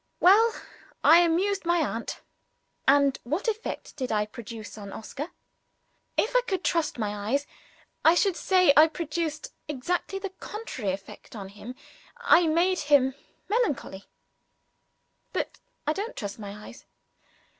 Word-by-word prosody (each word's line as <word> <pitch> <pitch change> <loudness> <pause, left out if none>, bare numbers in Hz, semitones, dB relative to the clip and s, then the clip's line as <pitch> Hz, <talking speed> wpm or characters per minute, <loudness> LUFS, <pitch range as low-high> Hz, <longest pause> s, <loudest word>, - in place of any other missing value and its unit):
Well, 440 +5 +6 0.5
I 330 - +8
amused 360 +4 +2
my 345 0 +2
aunt. 235 -8 -2 0.7
And 280 0 +4
what 310 - -2
effect 440 0 -3
did 260 -5 -3
I 210 -1 +1
produce 220 0 -9
on 200 -2 -8
Oscar? 280 - -6 0.9
If 455 +4 +1
I - - +6
could 380 -4 -1
trust 330 -6 0
my 210 -2 -3
eyes, 280 +3 +1 0.6
I 325 +2 +6
should 385 0 +2
say 365 -6 +4
I 310 +2 +8
produced 315 -1 -4
exactly 320 +7 -2
the 390 -1 -5
contrary 335 - -4
effect 195 +4 -9
on 195 -3 -7
him 210 +5 -9 0.4
I 470 -8 +5
made 350 +4 +2
him 265 -2 +5 0.3
melancholy. 380 - -1 1.3
But - - -3 0.3
I 305 - +2
don't 420 +7 -4
trust 205 +1 -5
my 210 0 -8
eyes. 255 - -13
305 Hz, 135 wpm, -27 LUFS, 230-370 Hz, 1.3 s, I